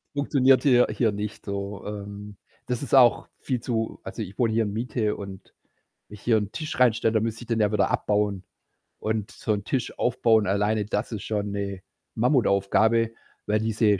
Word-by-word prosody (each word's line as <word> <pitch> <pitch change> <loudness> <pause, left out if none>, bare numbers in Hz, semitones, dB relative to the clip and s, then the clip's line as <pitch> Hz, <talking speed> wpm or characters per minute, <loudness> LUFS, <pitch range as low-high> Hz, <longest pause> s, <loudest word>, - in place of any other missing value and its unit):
Funktioniert 135 -2 +3
hier 125 -4 +5
hier 115 -3 +1
nicht 105 +1 -6
so. 100 0 -5
Ähm, 100 0 -7 0.3
das 125 -2 -2
ist 140 - +1
auch 125 -3 +5
viel 125 -3 -2
zu 115 -1 -3
also, - - -6
ich 95 - -7
wohne 115 -2 +2
hier 115 0 +2
in 105 - -3
Miete 110 -1 -1
und 95 -2 -10 0.6
wenn 105 - -10
ich 105 - -15
hier 115 -2 +3
'n 105 -1 -2
Tisch 155 -1 -5
reinstelle, 115 -2 +3
dann 110 - +2
müsste 115 +1 -3
ich 120 - -14
den 115 -1 0
ja 105 -1 +2
wieder 105 -2 +1
abbauen. 105 -2 0 0.6
Und 110 -2 -2
so 110 - -2
'n 100 - -3
Tisch 130 -3 -2
aufbauen 115 -3 +3
alleine, 105 +2 +1
das 105 +3 -2
ist 105 -4 -5
schon 105 -2 -2
'ne 100 -2 -4 0.3
Mammutaufgabe, 115 -2 +2 0.4
weil 105 +1 +2
diese 110 -2 +2
110 Hz, 190 wpm, -25 LUFS, 100-115 Hz, 0.6 s, hier